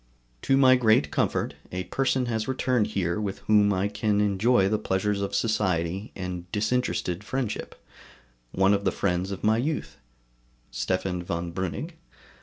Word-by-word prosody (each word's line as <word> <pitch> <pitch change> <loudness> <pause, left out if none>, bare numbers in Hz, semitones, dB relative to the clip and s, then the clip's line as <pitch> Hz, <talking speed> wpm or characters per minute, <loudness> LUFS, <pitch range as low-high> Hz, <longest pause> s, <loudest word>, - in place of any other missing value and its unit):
To 135 - +2
my 130 -1 +6
great 110 -12 +3
comfort, - - 0 0.2
a 90 0 -3
person 130 +3 0
has 110 -2 -2
returned 125 -4 +1
here 95 -2 -1
with 100 -2 -3
whom 105 -1 +4
I 95 +1 +1
can 105 0 0
enjoy 105 +1 +3
the 105 +1 0
pleasures 100 +2 -1
of 100 - -2
society 95 -3 0
and 90 -2 -6
disinterested 105 -4 -1
friendship, 125 -1 -3 0.8
one 95 +2 +3
of 100 0 0
the - - +2
friends 90 -1 -1
of 100 -2 -6
my 110 +1 +3
youth 145 +6 -3 0.7
[Stephan 95 -1 -2
von 85 0 -4
Breuning]. 95 - -4
100 Hz, 150 wpm, -26 LUFS, 95-115 Hz, 0.8 s, my